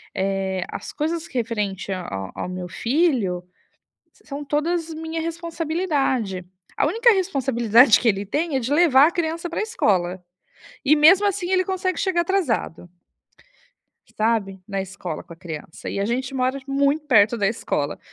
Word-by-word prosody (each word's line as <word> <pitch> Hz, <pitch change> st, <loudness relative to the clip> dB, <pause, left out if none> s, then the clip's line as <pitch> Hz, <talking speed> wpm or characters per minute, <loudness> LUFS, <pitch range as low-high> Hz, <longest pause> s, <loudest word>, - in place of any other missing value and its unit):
eh, 190 Hz, -1 st, -1 dB
as -, -, -6 dB
coisas 325 Hz, +2 st, -2 dB
referente 210 Hz, -6 st, -3 dB
a 185 Hz, -1 st, -2 dB
a 95 Hz, 0 st, -5 dB
ao -, -, -4 dB
meu 180 Hz, 0 st, -5 dB
filho 230 Hz, -, 0 dB, 0.7 s
são 285 Hz, 0 st, -8 dB
todas 320 Hz, +3 st, -1 dB
minha 320 Hz, +1 st, -4 dB
responsabilidade. 320 Hz, -, -2 dB, 0.3 s
A -, -, +2 dB
única 470 Hz, +1 st, +4 dB
responsabilidade 255 Hz, -, +4 dB
que 240 Hz, -, +2 dB
ele 200 Hz, -2 st, +1 dB
tem 300 Hz, -, -2 dB
é -, -, +1 dB
de 250 Hz, +3 st, -2 dB
levar 295 Hz, -3 st, +6 dB
a -, -, -2 dB
criança 335 Hz, 0 st, -2 dB
pra -, -, -3 dB
escola. 190 Hz, -, 0 dB, 0.6 s
E, 290 Hz, +3 st, +5 dB
mesmo 360 Hz, +7 st, +6 dB
assim, 360 Hz, -2 st, -2 dB
ele 370 Hz, 0 st, +3 dB
consegue 370 Hz, -1 st, -2 dB
chegar 370 Hz, -3 st, +1 dB
atrasado 330 Hz, -, -1 dB, 1.3 s
sabe, 215 Hz, -4 st, 0 dB
na 195 Hz, -2 st, -2 dB
escola 185 Hz, -4 st, -6 dB
com 170 Hz, -, -12 dB
a -, -, -13 dB
criança. 165 Hz, -1 st, -8 dB
E -, -, -3 dB
a 200 Hz, -, 0 dB
gente 250 Hz, +4 st, -1 dB
t -, -, -12 dB
mora 260 Hz, +1 st, 0 dB
muito 280 Hz, +2 st, +1 dB
perto 220 Hz, -3 st, +5 dB
da 200 Hz, -3 st, +1 dB
escola. 150 Hz, -9 st, -2 dB
265 Hz, 160 wpm, -23 LUFS, 195-330 Hz, 1.3 s, levar